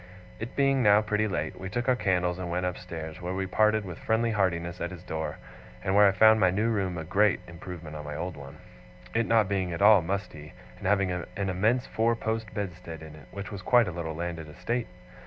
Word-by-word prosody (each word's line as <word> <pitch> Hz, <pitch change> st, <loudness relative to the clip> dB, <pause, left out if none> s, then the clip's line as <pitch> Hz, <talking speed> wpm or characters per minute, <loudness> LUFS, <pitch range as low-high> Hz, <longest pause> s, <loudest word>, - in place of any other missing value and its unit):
It 115 Hz, +4 st, -6 dB
being 135 Hz, -1 st, +3 dB
now 105 Hz, -1 st, +5 dB
pretty 105 Hz, 0 st, +1 dB
late, 80 Hz, -6 st, -3 dB
we 95 Hz, -, -5 dB
took 120 Hz, +4 st, -2 dB
our 130 Hz, -, +4 dB
candles 90 Hz, -4 st, 0 dB
and 90 Hz, -1 st, -4 dB
went 90 Hz, +1 st, -1 dB
upstairs, 80 Hz, -2 st, -5 dB
where 90 Hz, +1 st, -3 dB
we 95 Hz, 0 st, -1 dB
parted 110 Hz, +2 st, +2 dB
with 90 Hz, -3 st, -7 dB
friendly 115 Hz, +1 st, +1 dB
heartiness 90 Hz, -4 st, -1 dB
at 85 Hz, -, -1 dB
his 90 Hz, -2 st, -10 dB
door, 80 Hz, -2 st, -4 dB, 0.5 s
and 95 Hz, 0 st, 0 dB
where 105 Hz, 0 st, +7 dB
I -, -, +5 dB
found 110 Hz, +3 st, +6 dB
my 95 Hz, -, +5 dB
new 105 Hz, +5 st, +1 dB
room 95 Hz, -5 st, -1 dB
a 80 Hz, -, -4 dB
great 100 Hz, +4 st, +3 dB
improvement 85 Hz, -2 st, -8 dB
on 75 Hz, -, -6 dB
my 75 Hz, 0 st, -6 dB
old 90 Hz, +3 st, -4 dB
one, 70 Hz, +1 st, -10 dB, 0.6 s
it 115 Hz, 0 st, +1 dB
not 110 Hz, -3 st, +4 dB
being 95 Hz, -3 st, -1 dB
at 85 Hz, -, -4 dB
all 105 Hz, -2 st, +8 dB
musty, 85 Hz, -4 st, -5 dB, 0.3 s
and -, -, -3 dB
having 100 Hz, -2 st, +2 dB
an 90 Hz, -1 st, -3 dB
immense 100 Hz, +6 st, +1 dB
four 115 Hz, +1 st, +1 dB
post 110 Hz, -2 st, -3 dB
bedstead 90 Hz, -5 st, -6 dB
in 80 Hz, -1 st, -10 dB
it, 75 Hz, -3 st, -14 dB
which 100 Hz, +2 st, -7 dB
was 100 Hz, -2 st, -6 dB
quite 120 Hz, +3 st, +4 dB
a -, -, -2 dB
little 80 Hz, -2 st, -4 dB
landed 85 Hz, -2 st, -5 dB
estate. 120 Hz, +10 st, -3 dB
95 Hz, 225 wpm, -28 LUFS, 85-110 Hz, 0.6 s, all